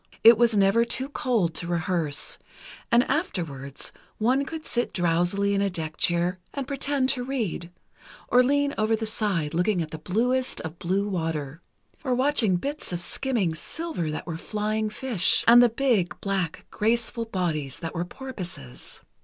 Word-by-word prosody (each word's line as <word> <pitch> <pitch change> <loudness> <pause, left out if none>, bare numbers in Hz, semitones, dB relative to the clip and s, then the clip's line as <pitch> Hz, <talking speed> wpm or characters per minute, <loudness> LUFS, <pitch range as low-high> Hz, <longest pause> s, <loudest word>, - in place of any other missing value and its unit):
It 230 +1 +10
was 230 -1 +3
never 200 +4 +4
too 260 +3 -1
cold 230 - 0
to 170 +2 -4
rehearse, 170 -3 -1 0.5
and 235 +1 +6
afterwards, 165 - -3 0.3
one 255 +5 +2
could 315 +2 -7
sit 240 0 -1
drowsily 175 +4 +1
in 200 - +1
a 200 - +2
deck 160 -4 -5
chair 175 +2 +1 0.2
and 280 -2 -2
pretend 275 -1 0
to 250 -2 0
read, 225 -10 -3 0.6
or 250 - +5
lean 285 +2 +2
over 215 +1 +3
the 220 0 -3
side, 200 -8 -1
looking 180 +3 +1
at 160 -2 -3
the 160 - -6
bluest 250 +9 0
of 160 +1 -7
blue 195 +4 0
water, 165 -5 -3 0.4
or 255 -3 +1
watching 255 -7 +2
bits 285 +9 -3
of 175 - -1
skimming 210 -2 0
silver 310 - -3
that 155 - -4
were 165 -2 -4
flying 215 +3 -2
fish, 230 -5 +3
and 240 +1 +9
the 245 - +6
big, 230 -7 0
black, 190 -5 -2
graceful 230 +1 0
bodies 165 - -2
that 165 - -5
were 170 -1 -1
porpoises. 180 - -8
200 Hz, 160 wpm, -26 LUFS, 170-245 Hz, 0.6 s, It